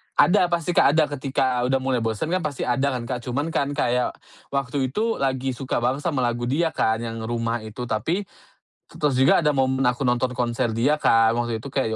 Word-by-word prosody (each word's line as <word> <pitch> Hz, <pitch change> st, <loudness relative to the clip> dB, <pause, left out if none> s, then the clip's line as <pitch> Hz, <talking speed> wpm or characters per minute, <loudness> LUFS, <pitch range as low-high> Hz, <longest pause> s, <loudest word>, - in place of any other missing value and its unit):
Ada 180 Hz, -1 st, +4 dB
pasti 170 Hz, 0 st, -1 dB
Kak 145 Hz, -3 st, +4 dB
ada, 160 Hz, -, +5 dB
ketika 130 Hz, -2 st, 0 dB
udah 135 Hz, +1 st, +2 dB
mulai 130 Hz, -2 st, +1 dB
bosen 115 Hz, +7 st, -2 dB
kan 185 Hz, -, +2 dB
pasti 150 Hz, -5 st, -3 dB
ada 130 Hz, +3 st, 0 dB
kan 120 Hz, -, -4 dB
Kak 125 Hz, +1 st, -3 dB
cuman 145 Hz, +6 st, -2 dB
kan 140 Hz, -, 0 dB
kayak 125 Hz, -3 st, 0 dB, 0.4 s
waktu 135 Hz, 0 st, -1 dB
itu 220 Hz, -, -1 dB
lagi 135 Hz, -1 st, 0 dB
suka 130 Hz, -1 st, -3 dB
banget 130 Hz, +3 st, +1 dB
sama 145 Hz, -7 st, 0 dB
lagu 120 Hz, 0 st, -1 dB
dia 160 Hz, +5 st, +1 dB
kan 110 Hz, +1 st, 0 dB
yang 115 Hz, -1 st, -5 dB
"Rumah" 115 Hz, 0 st, -1 dB
itu, 110 Hz, +3 st, -7 dB
tapi, 125 Hz, -, -1 dB, 0.7 s
terus 150 Hz, -3 st, -1 dB
juga 135 Hz, +5 st, +5 dB
ada 150 Hz, -, +3 dB
momen 130 Hz, -1 st, +1 dB
aku 125 Hz, +2 st, 0 dB
nonton 125 Hz, +1 st, +1 dB
konser 120 Hz, -1 st, -1 dB
dia 125 Hz, +7 st, +2 dB
Kak, 115 Hz, 0 st, +4 dB
waktu 120 Hz, -1 st, -1 dB
itu 140 Hz, -, -8 dB
kayak 135 Hz, -4 st, 0 dB
130 Hz, 205 wpm, -23 LUFS, 120-140 Hz, 0.7 s, ada